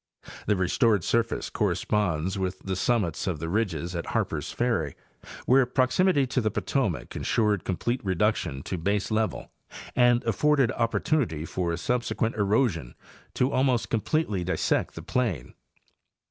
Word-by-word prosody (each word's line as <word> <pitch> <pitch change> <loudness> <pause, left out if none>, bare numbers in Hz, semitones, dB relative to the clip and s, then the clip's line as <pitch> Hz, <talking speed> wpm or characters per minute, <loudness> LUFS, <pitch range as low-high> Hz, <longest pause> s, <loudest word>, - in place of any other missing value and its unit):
The 105 - +3
restored 95 +2 +2
surface 115 +3 0
corresponds 95 -3 0
with 95 0 -2
the 95 -1 -3
summits 100 -6 0
of 90 -4 -1
the 80 - -5
ridges 90 -4 -1
at 85 - -4
Harpers - - -2
Ferry, 110 - -1 0.5
where 130 0 +4
proximity 140 +5 +2
to 125 0 -1
the 110 - +1
Potomac - - -2
insured 105 -4 +1
complete 120 +7 -2
reduction 95 -7 0
to 90 - -4
baselevel 105 +4 -1 0.5
and 120 -1 +4
afforded 135 +3 +2
opportunity 115 - 0
for 85 -1 -2
subsequent 120 +1 -1
erosion 100 - +1 0.4
to 130 +2 +1
almost 130 -3 +1
completely 115 - 0
dissect 95 +2 0
the - - -7
plain. 105 - -2
105 Hz, 130 wpm, -27 LUFS, 90-120 Hz, 0.5 s, where